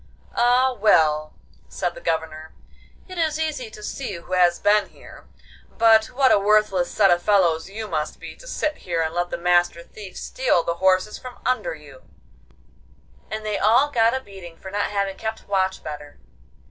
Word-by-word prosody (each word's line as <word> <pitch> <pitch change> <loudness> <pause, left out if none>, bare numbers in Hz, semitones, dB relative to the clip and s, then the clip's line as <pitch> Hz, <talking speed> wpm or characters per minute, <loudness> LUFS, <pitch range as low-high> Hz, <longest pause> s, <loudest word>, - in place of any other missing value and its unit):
'Ah, 250 +2 +3
well,' 155 -7 +3 0.3
said 175 - -3
the - - -12
Governor, 160 -1 -3 0.5
'it 370 -2 -7
is 315 -1 0
easy 295 -7 -3
to 210 -1 -12
see 250 0 -5
who 170 +2 -9
has 175 -1 +4
been 205 0 +2
here; - - -15 0.4
but 225 -1 +4
what 260 +1 +2
a - - +5
worthless 205 -3 +2
set 200 -3 +3
of 175 0 +3
fellows 175 -4 +2
you 215 +2 -6
must 155 -4 -3
be - - -9
to - - -15
sit 305 -10 -2
here 170 -2 -2
and 160 0 -3
let 175 0 -1
the - - -4
Master 175 0 +1
Thief 195 +1 -12
steal 250 -10 0
the 170 0 -2
horses 190 +2 +2
from 255 -1 -10
under 250 -9 0
you!' 145 -4 -15 1.3
And 215 0 -5
they 210 -1 -2
all 245 +8 +3
got 230 -1 +3
a - - -1
beating 190 -8 -12
for 190 - -10
not 205 +1 -1
having 200 -1 -2
kept 220 0 -5
watch 190 -1 0
better. 150 -1 -8
200 Hz, 180 wpm, -23 LUFS, 170-225 Hz, 1.3 s, a